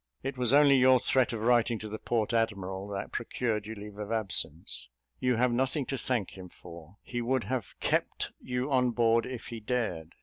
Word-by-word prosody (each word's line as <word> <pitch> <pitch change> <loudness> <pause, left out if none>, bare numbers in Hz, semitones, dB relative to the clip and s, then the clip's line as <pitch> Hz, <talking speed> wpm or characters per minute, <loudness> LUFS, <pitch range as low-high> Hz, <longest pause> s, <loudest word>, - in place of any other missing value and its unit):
It 135 +1 -3
was 125 -2 0
only 140 -1 +6
your 130 0 +6
threat 130 0 +2
of 115 -2 -4
writing 120 0 +3
to 110 - -7
the 110 +1 -6
port 115 -1 -1
admiral 100 -4 -1
that 100 -1 -5
procured 110 -4 -2
you 110 - -6
leave 105 0 -10
of 105 +1 -5
absence. 85 - -1 0.3
You 125 -1 +2
have 125 +2 +2
nothing 130 +3 0
to 135 - -3
thank 120 -5 -1
him 90 -1 -10
for: 85 +2 -13
he 120 -1 -4
would 130 +1 0
have 125 -7 -4
kept - - 0
you 125 +2 -2
on 125 -2 +3
board 115 -1 +3
if 125 -2 -7
he 115 - -6
dared. 105 -9 -3
115 Hz, 200 wpm, -30 LUFS, 105-125 Hz, 0.3 s, only